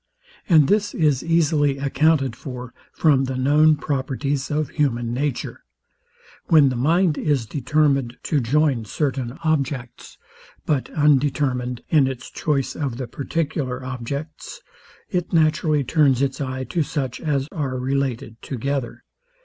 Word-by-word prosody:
And 155 -5 +6
this 205 0 +1
is 150 -6 +2
easily 155 -4 +2
accounted 140 -2 +1
for 125 -1 -8 0.2
from 140 -4 +3
the 130 0 -3
known 150 +4 +4
properties 140 -1 -2
of 150 -2 -1
human 120 -6 0
nature. 135 -1 -3 0.8
When 150 -4 +6
the 130 - -3
mind 160 +6 +2
is 140 -6 0
determined 135 0 0
to 150 - +1
join 135 -1 +1
certain 130 0 -2
objects, 140 -6 -2 0.5
but 145 -4 0
undetermined 135 -4 +1
in 145 -4 +4
its 130 -1 -6
choice 140 -4 -1
of 135 -6 -3
the 130 - -4
particular 135 -1 -3
objects, 140 - -6 0.5
It 180 -1 -2
naturally 155 -2 +2
turns 140 -1 +3
its 135 +1 -2
eye 130 -1 -3
to 160 +7 -2
such 135 -4 -3
as 140 -3 -1
are 135 -4 -3
related 125 -4 -2
together. 135 -1 -4
140 Hz, 130 wpm, -22 LUFS, 130-150 Hz, 0.8 s, And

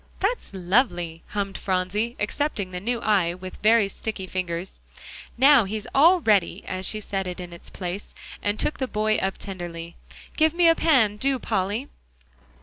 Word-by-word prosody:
"That's 430 +6 -1
lovely," 175 -4 0
hummed 200 -1 -3
Phronsie, 195 +5 -1
accepting 210 -3 -2
the 180 - -4
new 235 +4 -2
eye 190 -6 +2
with 185 0 -9
very 220 -1 +5
sticky 200 0 -5
fingers. 180 -1 -4 0.6
"Now, 270 -2 +7
he's 210 +2 -4
all 335 +6 +6
ready," 205 - +2
as 185 0 -3
she 215 - -1
set 195 -2 -3
it 180 +1 -5
in 175 -1 -7
its 170 - -10
place, 185 +2 -6 0.3
and 205 +1 -1
took - - -1
the 260 - -1
boy 215 -1 +1
up 190 0 -1
tenderly. 170 -3 -7 0.4
"Give 315 +1 +3
me 345 -1 +5
a 330 - +7
pan, 255 -12 +3
do, 270 +4 +1
Polly." 205 +3 -1
205 Hz, 165 wpm, -25 LUFS, 185-240 Hz, 0.6 s, Now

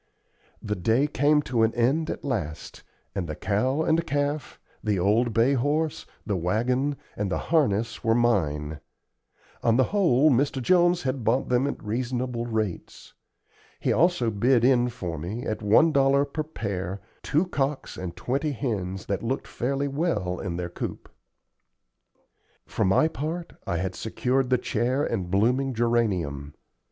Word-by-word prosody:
The 105 0 -2
day 110 +9 +2
came 150 +1 +2
to 120 -4 0
an 110 +1 +2
end 135 +7 +1
at - - -5
last, 85 - -4 0.3
and 95 -4 -3
the 75 - -3
cow 125 - 0
and 160 +1 +2
calf, 145 0 -2 0.2
the 105 -2 +1
old 110 +6 +2
bay 115 +5 +3
horse, 145 +4 0 0.2
the 105 - -1
wagon, 120 - 0 0.2
and 100 -2 -2
the - - +1
harness 115 -8 0
were 115 0 +3
mine. 80 -11 +1 0.8
On 115 0 +3
the 130 - +5
whole, 155 -8 +4
Mr. 135 +2 +1
Jones 175 +5 +3
had 130 -2 -2
bought 120 +5 +1
them 125 +2 +2
at - - -5
reasonable 120 +2 -2
rates. 110 -6 -4 0.7
He - - +1
also 165 -9 +2
bid 120 +3 +3
in 125 -2 +4
for 90 -10 -5
me, 100 +10 -5
at 110 - -3
one 110 +10 +5
dollar 140 0 +3
per 145 +2 -4
pair, 100 - -4 0.2
two 155 +5 +1
cocks 140 -5 -2
and 90 -2 -6
twenty 140 +4 -1
hens 95 -8 -3
that 100 - -2
looked 130 +4 -2
fairly 140 +3 -2
well 140 - -1
in 90 -3 -4
their 90 -1 -3
coop. - - -6 1.6
For - - -2
my 95 +12 +4
part, 160 +3 -4
I 90 -3 0
had 95 +2 -2
secured 125 +5 -1
the 130 - +4
chair 130 +4 0
and 95 -10 -2
blooming 125 +7 +1
geranium. 95 -12 0
120 Hz, 155 wpm, -26 LUFS, 100-140 Hz, 1.6 s, the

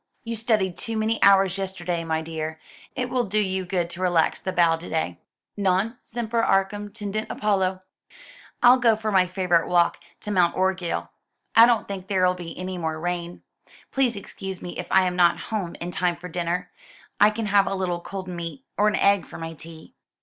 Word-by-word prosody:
"You 230 0 -4
studied 215 -5 0
too 225 -2 -4
many 220 +1 0
hours 195 -1 +5
yesterday, 180 -3 -3
my 160 -1 -1
dear. 160 -1 -5 0.4
It 250 -2 -3
will 250 -2 +1
do 210 +1 -2
you 190 -2 0
good 180 -2 -1
to 175 - -7
relax 175 -3 +2
the 185 - -3
bow 170 -2 +4
to 165 - -10
day. 90 - -2 0.4
Non 200 +3 +1
semper 230 0 -2
arcum 205 0 +1
tendit 215 0 -4
Apollo!" 190 -3 0 0.8
"I'll 250 +1 +8
go 230 -3 +4
for 215 0 -3
my 185 -2 +4
favourite 180 -2 +1
walk 175 -1 +2 0.2
to 210 - -5
Mount 180 -3 +3
Orgueil. 185 -2 -1 0.5
I 230 +1 +9
don't 235 -3 +2
think 195 -2 -6
there'll 185 -2 +2
be 175 -2 -8
any 185 0 -4
more 160 -1 -2
rain. 175 0 -4 0.5
Please 260 -4 +1
excuse 195 -1 -7
me 175 - -7
if - - -4
I 190 - +5
am 180 -1 -1
not 175 -1 +4 0.2
home 190 -6 -2
in 175 +1 -4
time 175 0 0
for 175 +2 -9
dinner. 180 +1 -3 0.5
I 210 - +7
can 215 +1 -3
have 200 -1 +3
a - - -1
little 180 -2 -1
cold 190 +1 -6
meat, 175 +9 -6
or 210 - +5
an 210 - +2
egg, 200 -2 +3
for - - -9
my 165 0 -6
tea." 160 0 -12
185 Hz, 195 wpm, -24 LUFS, 175-210 Hz, 0.8 s, I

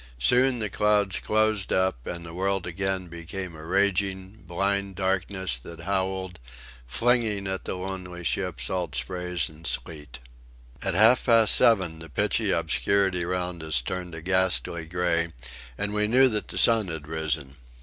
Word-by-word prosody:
Soon 125 - +3
the 110 -2 -3
clouds 105 -2 +1
closed 110 -2 0
up 95 -10 0
and 85 -1 -6
the 85 - -9
world 95 +1 -1
again 95 +1 -2
became 85 +1 -7
a 80 - -11
raging, 95 +2 -1
blind 100 +2 -1
darkness 95 -6 -1
that 80 +6 -10
howled, 95 0 -2 0.5
flinging 115 - +1
at 95 0 -4
the - - -3
lonely 90 -1 -6
ship 90 -4 -2
salt 80 +3 -2
sprays 90 +7 -2
and 80 +1 -10
sleet. 75 -5 -4 0.6
About - - +1
half 110 +6 +7
past 115 -3 +6
seven 95 -8 +4
the 80 0 -10
pitchy 70 - 0
obscurity 90 +3 +1
round 90 -1 -3
us 80 -4 +1
turned 90 +6 -5
a 80 - -9
ghastly 95 -3 0
grey, 85 -1 0 0.5
and 100 0 -2
we 105 0 +1
knew 130 +4 +5
that 105 -2 -3
the - - -7
sun 115 -4 +4
had 80 -3 -6
risen. 75 -4 -2
95 Hz, 155 wpm, -26 LUFS, 85-100 Hz, 0.6 s, half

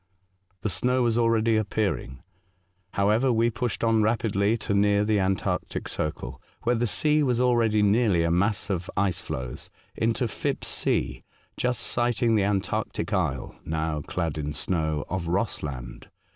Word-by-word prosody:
The 110 - -1
snow 125 +5 +2
was 115 -2 +2
already 115 -1 +3
appearing. 100 - -2 0.7
However, 110 +6 +3
we 115 0 +2
pushed 120 -1 -3
on 115 -1 +3
rapidly 110 -1 +1
to 105 - -3
near 100 0 +3
the 105 -1 +2
antarctic 95 -1 -1
circle, 65 -4 -4 0.2
where 120 - +2
the 120 0 +1
sea 150 +6 +2
was 125 -4 +1
already 115 -4 +3
nearly 105 -4 +3
a 85 - +1
mass 100 +3 +1
of 90 -1 -2
ice 100 -3 +1
floes, 65 -1 -6 0.3
into 115 +2 0
Philipp's 105 - -3
Sea, - - -1 0.3
just 125 -1 -1
sighting 120 0 +1
the 105 -3 +3
antarctic 100 -1 -1
isle - - -1
(now 80 -1 -2
clad 80 0 -3
in 75 0 -3
snow) 80 -4 -1
of 90 -3 -3
Rossland. 75 - -3
105 Hz, 145 wpm, -26 LUFS, 90-115 Hz, 0.7 s, already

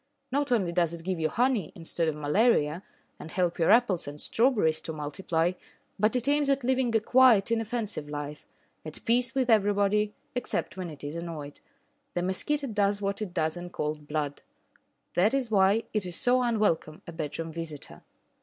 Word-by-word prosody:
Not 285 0 0
only 195 -8 +2
does 170 -1 +1
it 165 - -10
give 185 -2 -2
you 160 -1 +1
honey 240 - +1
instead 165 -1 -2
of 155 - 0
malaria, 150 +1 +2 0.4
and 160 - -8
help 175 0 -1
your 165 - +3
apples 215 -7 +4
and 145 +1 -7
strawberries 205 - +2
to - - -5
multiply, 160 +3 -1 0.5
but 215 +4 +3
it 250 +1 0
aims 290 0 +2
at 275 -1 +1
living 255 -2 +1
a - - +5
quiet, 230 -2 +5
inoffensive 225 -8 -2
life, 145 0 -6 0.4
at 155 -1 -7
peace 240 +2 +1
with 260 -2 +1
everybody, 205 -1 +2 0.2
except 245 -5 -2
when 185 -2 -5
it 150 -3 -11
is 145 +2 -5
annoyed. 165 -4 -6 0.6
The 175 - 0
mosquito 280 +11 0
does 205 -4 +1
what 200 +1 -2
it 205 -4 -3
does 160 -2 -1
in 175 0 -7
cold 150 -3 -4
blood. 145 -2 -3 0.7
That 205 +9 +3
is 255 -4 -1
why 200 +2 +4
it 210 -4 0
is 175 - -2
so 250 +5 +3
unwelcome 210 -10 0
a - - -8
bedroom 165 0 -5
visitor. 160 -3 -7
190 Hz, 180 wpm, -28 LUFS, 160-230 Hz, 0.7 s, a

